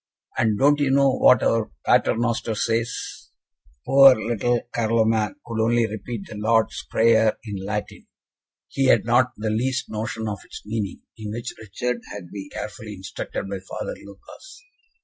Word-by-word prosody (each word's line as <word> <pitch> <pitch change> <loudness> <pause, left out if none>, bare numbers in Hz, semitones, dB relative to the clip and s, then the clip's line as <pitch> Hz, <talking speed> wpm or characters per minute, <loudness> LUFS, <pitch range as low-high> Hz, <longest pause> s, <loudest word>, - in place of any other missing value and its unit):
And, 110 -2 +1
don't 145 +4 +4
you 145 -2 +2
know 135 0 +4
what 125 -2 +5
our 115 -2 +1 0.2
Pater - - +3
Noster 115 -1 -1
says?" 115 +1 -2 0.6
Poor 135 -1 +8
little 120 +2 0
Carloman 110 0 +1
could 115 -1 -2
only 120 +1 +3
repeat 110 0 -6
the 105 - -9
Lord's 110 +1 +1
Prayer 110 -1 +3
in 100 -4 -6
Latin 105 +1 -5 0.6
he 135 - -1
had - - +4
not 120 +2 +4
the 110 0 -2
least 125 +4 -1
notion 110 +1 -3
of 105 -2 -4
its - - -11
meaning 105 -3 -4 0.2
in 105 -1 -5
which 120 +2 -5
Richard 120 +3 -3
had 95 -4 -8
been 100 -1 -7
carefully 105 0 -7
instructed 95 +1 -6
by 95 0 -4
Father 95 - -6
Lucas. - - -14
110 Hz, 155 wpm, -23 LUFS, 105-120 Hz, 0.6 s, Poor